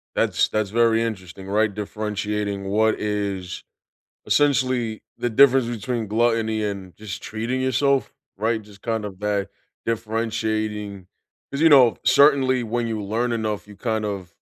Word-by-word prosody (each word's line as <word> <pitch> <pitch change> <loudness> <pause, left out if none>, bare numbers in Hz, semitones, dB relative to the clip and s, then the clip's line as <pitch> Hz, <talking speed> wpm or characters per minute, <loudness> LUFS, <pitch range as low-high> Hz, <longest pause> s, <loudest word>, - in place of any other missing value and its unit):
That's - - +2
that's 110 -2 -1
very 115 0 +3
interesting, 95 -4 -5
right, 105 +2 +1
differentiating 105 -1 -3
what 110 +3 +2
is 100 -3 -3 0.6
essentially 130 -6 +1 0.2
the 120 - 0
difference 130 +1 +5
between 120 0 -3
gluttony 110 0 +1
and 100 -3 -5
just 105 -1 -7
treating 115 +4 -3
yourself, 130 +1 +1 0.3
right, 110 +2 0
just 105 -1 -17
kind 115 -2 -2
of 100 -3 -7
that 105 -2 -1 0.4
differentiating 110 -3 -2 0.4
'cause, 140 - -4
you 165 - +6
know, 130 -7 +6
certainly 135 -3 +5
when 120 +1 -2
you 110 -2 -3
learn 115 +4 -1
enough 110 -3 -2
you 105 - -12
kind 110 +1 -2
of 95 -4 -5
110 Hz, 140 wpm, -23 LUFS, 105-120 Hz, 0.6 s, you